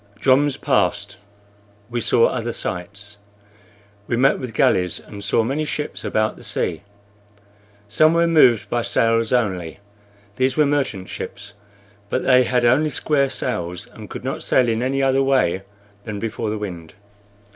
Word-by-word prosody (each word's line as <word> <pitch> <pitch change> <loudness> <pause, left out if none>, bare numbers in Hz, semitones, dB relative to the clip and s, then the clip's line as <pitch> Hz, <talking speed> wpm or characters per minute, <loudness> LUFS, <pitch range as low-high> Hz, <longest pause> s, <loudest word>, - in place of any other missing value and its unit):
Joms 135 +3 +3
passed. - - 0 0.7
We 120 0 -2
saw 115 - +4
other 120 -2 -2
sights; 100 +3 -6 0.9
we 120 - -1
met 135 +3 +3
with 125 -3 -6
galleys 90 -4 +2
and 100 -1 -10
saw 105 +3 +2
many 135 +7 -1
ships 150 0 -4
about 110 0 -1
the - - -14
sea. 80 - -2 1.1
Some 155 +11 +3
were 170 0 +3
moved 125 - +4
by 120 +3 -1
sails 115 -1 +1
only; 95 -10 -1 0.6
these 130 +1 +1
were 150 - +5
merchant 135 -10 -1
ships, 100 0 -7 0.6
but 130 - -1
they 125 -1 +5
had 125 0 +1
only 140 +6 +3
square 140 -2 0
sails, 90 -8 -3
and - - -12
could - - -8
not - - -4
sail 125 -2 +2
in 115 0 0
any 135 +2 0
other 135 0 +3
way 135 -9 +1 0.4
than 105 -1 -6
before 110 +1 -3
the 110 - -2
wind. 90 -6 -7
120 Hz, 155 wpm, -21 LUFS, 105-135 Hz, 1.1 s, were